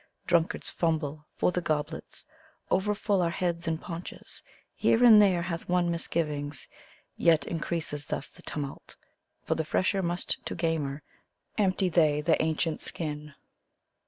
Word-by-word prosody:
Drunkards 170 -1 +1
fumble 155 -2 -1
for - - +3
the 180 - -1
goblets, 150 -3 -3 0.5
over 210 +2 +2
full 205 -2 +1
are 170 - +2
heads 170 -1 -2
and 160 -1 0
paunches; 170 +1 -8 0.3
Here 230 - +3
and 220 -3 +9
there 185 -4 +4
hath 170 -1 -4
one 175 -1 +2
misgivings, 150 -4 -2 0.5
yet 160 -4 +4
increases 160 -3 -3
thus - - -3
the - - -15
tumult; 140 -2 -6 0.5
For, - - 0
the 160 - -1
fresher 185 +5 +1
must 175 0 -1
to - - -4
gamer, 155 -4 -1 0.5
empty 190 -2 +2
they 155 -4 +3
the 160 +2 +2
ancient 160 0 0
skin! 150 -2 -4
165 Hz, 140 wpm, -29 LUFS, 150-180 Hz, 0.5 s, and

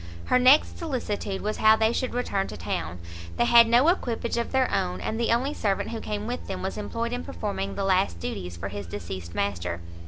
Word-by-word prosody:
Her 250 - +3
next 260 +4 +5
solicitude 225 - -3
was 215 +1 -2
how 220 0 +6
they 220 +1 +2
should 255 -1 -2
return 200 -6 -1
to - - -8
town; 85 0 -3 0.4
they 120 - +3
had 235 - +7
no 240 +5 +5
equipage 240 -9 0
of 235 0 -2
their 265 -1 +3
own, 180 -2 0
and 220 - -3
the 235 - +1
only 255 +5 +1
servant 200 -7 -1
who 230 - -4
came 210 0 -4
with 245 +2 -4
them 185 -1 -4
was 190 - -3
employed 230 +3 -3
in 245 - -3
performing 95 +3 -4
the 195 - -2
last 185 - +2
duties 90 0 -5
for 95 +3 -5
his 100 -1 -6
deceased 85 -1 -7
master. 90 -3 -2
210 Hz, 215 wpm, -26 LUFS, -, 0.4 s, had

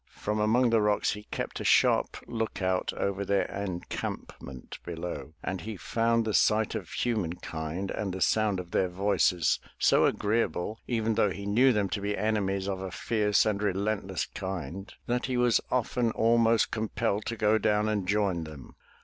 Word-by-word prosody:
From 105 0 -2
among 115 +3 +3
the 115 -1 +4
rocks 105 -1 +2
he 105 0 -7
kept - - -4
a - - -4
sharp - - +3
lookout 95 -5 -1
over 100 0 -2
their 100 0 +2
encampment 90 -8 -6
below, 80 -4 -6
and 95 -1 -3
he 110 +1 -6
found 115 +5 +1
the 110 - -1
sight 110 +1 +3
of - - -5
human 105 -9 -1
kind 80 +4 -5
and 100 -3 -3
the 95 - -5
sound 105 -1 +2
of 90 -1 -8
their 95 - +1
voices 90 -3 +2 0.2
so - - +4
agreeable 110 -1 -1
even 115 -2 0
though 105 - +3
he 100 +2 -6
knew 120 +6 +4
them 105 -4 +1
to 100 - -3
be 100 +1 -2
enemies 100 -3 0
of 95 -1 -3
a 95 - -4
fierce 105 +1 +1
and 105 -2 0
relentless 100 -2 -1
kind, 95 0 -6
that 125 +1 -1
he 130 -1 -1
was 120 -2 +3
often 125 -1 +1
almost 115 0 +3
compelled 110 -2 -1
to 115 - -2
go 110 +1 +3
down 105 0 +2
and 105 -4 -1
join 100 -4 +1
them. 75 -4 -11
105 Hz, 175 wpm, -28 LUFS, 95-110 Hz, 0.2 s, the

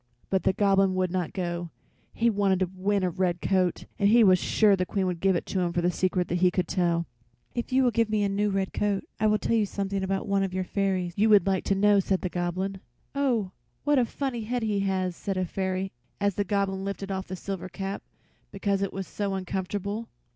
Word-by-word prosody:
But 190 -1 +2
the - - +4
Goblin 195 -1 +3
would 185 -1 0
not 180 -3 -1
go; 175 -2 -3 0.4
he 235 - +1
wanted 200 -4 +2
to 185 -1 0
win 195 +1 0
a 180 - +1
red 180 -1 0
coat, 185 -2 +1
and 200 -1 +4
he 230 +2 +6
was 185 -3 +6
sure 210 +1 +4
the 185 - 0
Queen 190 +1 -1
would 180 -2 -2
give 190 +1 +3
it - - -2
to 190 - -2
him 175 -1 0
for 175 - 0
the 175 - +3
secret 180 0 0
he 180 +1 +4
could 180 -1 -1
tell. 170 -2 +1 0.5
"If 240 +1 -4
you 260 +1 +4
will 245 - +3
give 230 0 +1
me 215 -1 +1
a - - +2
new 205 +1 +1
red 195 -1 -1
coat 205 -2 0 0.2
I 215 - +3
will 215 0 +4
tell 230 - 0
you 215 -2 +2
something 195 0 -2
about 195 +2 -2
one 200 -1 +2
of 190 -1 -2
your 185 - 0
fairies 185 -2 -1
you 215 +2 +4
would 205 -2 +6
like 190 -2 +1
to 195 - +2
know," 205 +1 +4
said 190 0 0
the 185 - -2
Goblin. 185 +2 -2 0.3
"Oh, 245 -9 0 0.3
what 290 -2 +3
a 245 - +3
funny 240 -2 -3
head 245 +1 -2
he 210 -2 0
has!" 190 -2 0
said 195 +1 -3
a 185 - +1
fairy 190 +1 -2 0.3
as 200 0 +1
the 205 +2 -1
Goblin 195 -1 0
lifted 195 0 -4
off 190 0 -3
the 185 - -5
silver 190 0 -5
cap, 195 +2 -4 0.5
because 200 -2 -1
it 195 - -1
was 195 0 -4
so 200 0 -3
uncomfortable. 195 +4 -3
195 Hz, 235 wpm, -27 LUFS, 185-205 Hz, 0.5 s, he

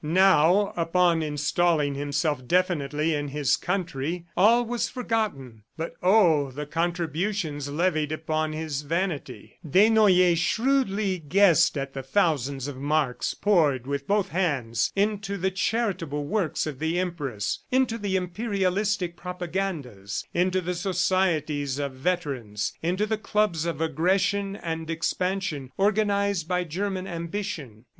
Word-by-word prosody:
Now, 185 +3 +4
upon 170 0 +2
installing 150 0 +1
himself 145 -1 -2
definitely 160 -3 +1
in 145 -1 -2
his 140 -1 +1
country, 175 -2 -3
all 230 +6 +5
was 240 0 -2
forgotten. 215 - -3 0.2
But, 165 +1 -4
oh, 175 -8 +4
the 145 +3 -6
contributions 165 -1 -2
levied 155 -1 0
upon 155 0 -1
his 155 -2 -3
vanity... 150 - -4
Desnoyers 185 -1 +5
shrewdly 215 -3 +1
guessed 170 0 +4
at 135 0 -4
the 135 - -4
thousands 140 - 0
of 145 -2 -6
marks 145 -2 0
poured 155 - +2
with 140 0 -3
both 200 -1 +1
hands 140 -11 0
into 200 0 0
the 190 +1 0
charitable 185 -8 -1
works 175 0 -1
of 150 -4 -5
the 160 +2 -1
Empress, 145 - -2
into 250 -3 +1
the 200 -2 -1
imperialistic 190 -1 -1
propagandas, 175 - -4
into 185 +1 +1
the 180 +1 -2
societies 170 -7 0
of 140 -1 -2
veterans, 130 - -2
into 180 +5 0
the 215 0 -2
clubs 210 -7 0
of 170 - -3
aggression 190 +5 +1
and 165 -4 -5
expansion 165 -4 -2
organized 200 -3 +1
by 180 0 0
German 185 +3 -3
ambition. 170 - -5
170 Hz, 125 wpm, -26 LUFS, 145-195 Hz, 0.2 s, all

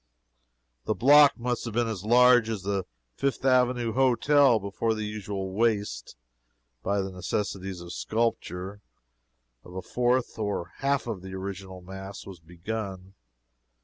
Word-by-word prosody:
The 110 - 0
block 145 +2 +6
must 120 0 -2
have 115 -2 -5
been 120 -1 +2
as 105 -5 -4
large 120 0 +5
as 105 -4 -3
the 100 -1 -2 0.3
Fifth 135 - -2
Avenue 125 -3 +2
Hotel 135 +1 +4
before 105 +3 -1
the 110 -1 -3
usual 100 -2 -4
waste 105 - -1 0.7
(by 100 +8 0
the 95 0 -4
necessities 95 0 -3
of 85 0 -8
sculpture) 105 -4 -2 0.8
of 90 - -13
a 95 - -5
fourth 125 +2 0
or 105 -3 -1
a 85 - -21
half 140 0 +1
of 110 -6 -4
the 95 0 -8
original 95 -1 -7
mass 95 +2 -9
was 95 -3 -10
begun. 95 +3 -6
105 Hz, 145 wpm, -27 LUFS, 95-120 Hz, 0.8 s, block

